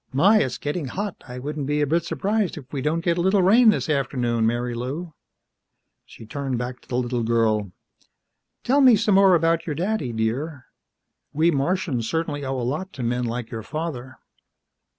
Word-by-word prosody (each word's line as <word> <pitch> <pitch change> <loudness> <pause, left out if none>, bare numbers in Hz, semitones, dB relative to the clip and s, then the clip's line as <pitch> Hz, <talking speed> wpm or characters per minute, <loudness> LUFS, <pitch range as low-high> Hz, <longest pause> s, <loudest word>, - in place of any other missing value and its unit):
"My, 195 +11 +5
it's 130 - -2
getting 145 0 -3
hot. 200 +7 -5
I 125 0 -8
wouldn't 145 +2 -4
be 145 +1 0
a 145 - +3
bit 165 +4 +1
surprised 205 0 -1
if 140 -2 -11
we 140 - -2
didn't 160 +4 -1
get 170 0 +1
a - - +2
little 190 +1 +3
rain 225 +5 +6
this 210 - +1
afternoon, 120 -6 0
Marilou." 125 +8 -3 0.9
She 115 - -13
turned 135 +2 -3
back 125 +1 -5
to - - -24
the 125 - -2
little 125 -1 -1
girl. 110 -4 +1 0.9
"Tell 275 +4 +3
me 255 -4 +7
some 210 0 +1
more 195 -1 +6
about 165 0 +1
your 150 - -2
daddy, 180 - -1
dear. 130 +6 -3 0.7
We 160 +3 +3
Martians 140 - -1
certainly 160 -3 -2
owe 135 -1 -2
a - - -3
lot 155 +10 -3
to 130 - -6
men 120 +1 -1
like 120 0 -4
your 115 - -4
father." 130 -1 -5
145 Hz, 185 wpm, -23 LUFS, 125-170 Hz, 0.9 s, me